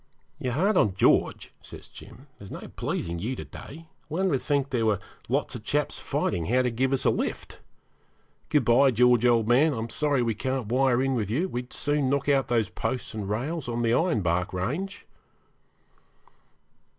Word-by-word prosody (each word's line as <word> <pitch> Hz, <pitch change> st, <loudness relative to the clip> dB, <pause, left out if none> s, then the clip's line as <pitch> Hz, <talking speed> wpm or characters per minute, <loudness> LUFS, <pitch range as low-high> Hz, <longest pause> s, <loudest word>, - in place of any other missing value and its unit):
'You're 130 Hz, -5 st, -2 dB
hard 190 Hz, -, +2 dB
on 100 Hz, -, +3 dB
George,' -, -, +2 dB
says -, -, -12 dB
Jim, 130 Hz, -, -14 dB
'there's 100 Hz, -, -11 dB
no -, -, -8 dB
pleasing 85 Hz, 0 st, -3 dB
you 120 Hz, +8 st, -3 dB
to -, -, -7 dB
day; 165 Hz, +4 st, -11 dB, 0.2 s
one 185 Hz, +6 st, 0 dB
would 135 Hz, -6 st, 0 dB
think 140 Hz, -1 st, 0 dB
there 115 Hz, -3 st, +1 dB
were 105 Hz, -3 st, +2 dB, 0.3 s
lots -, -, 0 dB
of -, -, -7 dB
chaps -, -, -1 dB
fighting 85 Hz, -2 st, -2 dB
how 125 Hz, +3 st, +3 dB
to 125 Hz, -, 0 dB
give 130 Hz, +3 st, 0 dB
us 135 Hz, -, +1 dB
a -, -, +5 dB
lift. -, -, -4 dB, 0.9 s
Good 145 Hz, -5 st, +2 dB
bye, 125 Hz, +4 st, +5 dB
George, 125 Hz, 0 st, +4 dB
old 115 Hz, -2 st, +3 dB
man; 140 Hz, +5 st, +4 dB
I'm 115 Hz, 0 st, -4 dB
sorry 145 Hz, -2 st, +1 dB
we 115 Hz, -1 st, 0 dB
can't 130 Hz, +3 st, -2 dB
wire 130 Hz, 0 st, +3 dB
in 135 Hz, 0 st, +1 dB
with 110 Hz, -6 st, -1 dB
you; 155 Hz, -, 0 dB
we'd 125 Hz, -7 st, -5 dB
soon 145 Hz, -2 st, 0 dB
knock 140 Hz, 0 st, 0 dB
out 140 Hz, -2 st, +2 dB
those 115 Hz, -4 st, +1 dB
posts 125 Hz, +3 st, -4 dB
and 105 Hz, -3 st, -5 dB
rails 135 Hz, +7 st, -3 dB
on 120 Hz, 0 st, -2 dB
the 115 Hz, -, +2 dB
ironbark 90 Hz, -, +1 dB
range.' 145 Hz, -, -3 dB
125 Hz, 185 wpm, -26 LUFS, 115-140 Hz, 0.9 s, a